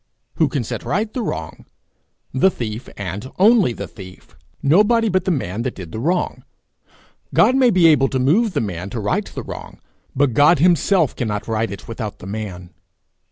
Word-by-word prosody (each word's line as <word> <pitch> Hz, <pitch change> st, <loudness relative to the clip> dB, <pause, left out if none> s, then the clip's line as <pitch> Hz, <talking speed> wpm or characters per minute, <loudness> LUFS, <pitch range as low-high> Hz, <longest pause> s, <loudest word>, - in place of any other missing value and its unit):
Who 160 Hz, -, +3 dB
can 135 Hz, -2 st, -2 dB
set -, -, -5 dB
right 210 Hz, +3 st, -1 dB
the 255 Hz, -, -2 dB
wrong? 80 Hz, -, -5 dB, 0.7 s
The 135 Hz, +9 st, +4 dB
thief, 115 Hz, -, -6 dB
and 100 Hz, -, -5 dB
only 210 Hz, -, +5 dB
the -, -, -6 dB
thief; 95 Hz, -2 st, -13 dB, 0.3 s
nobody 215 Hz, +9 st, +4 dB
but 185 Hz, -1 st, 0 dB
the -, -, 0 dB
man 115 Hz, -, -2 dB
that 125 Hz, +1 st, -3 dB
did 90 Hz, -4 st, -9 dB
the 110 Hz, -, -5 dB
wrong. 175 Hz, +8 st, -1 dB, 0.9 s
God 255 Hz, -, +5 dB
may 260 Hz, -2 st, +5 dB
be 185 Hz, -6 st, +3 dB
able 150 Hz, -4 st, +5 dB
to 130 Hz, -, -2 dB
move 180 Hz, -, +2 dB
the 145 Hz, -, 0 dB
man 95 Hz, -3 st, -4 dB
to 120 Hz, -, -5 dB
right 105 Hz, -1 st, 0 dB
the -, -, -7 dB
wrong, -, -, -9 dB, 0.4 s
but 135 Hz, -2 st, +2 dB
God 150 Hz, +7 st, +5 dB
himself 170 Hz, 0 st, +3 dB
cannot 105 Hz, -4 st, -3 dB
right 115 Hz, 0 st, -1 dB
it 100 Hz, -, -9 dB
without 110 Hz, -3 st, -5 dB
the -, -, -12 dB
man. 95 Hz, -4 st, -6 dB
130 Hz, 185 wpm, -20 LUFS, -, 0.9 s, only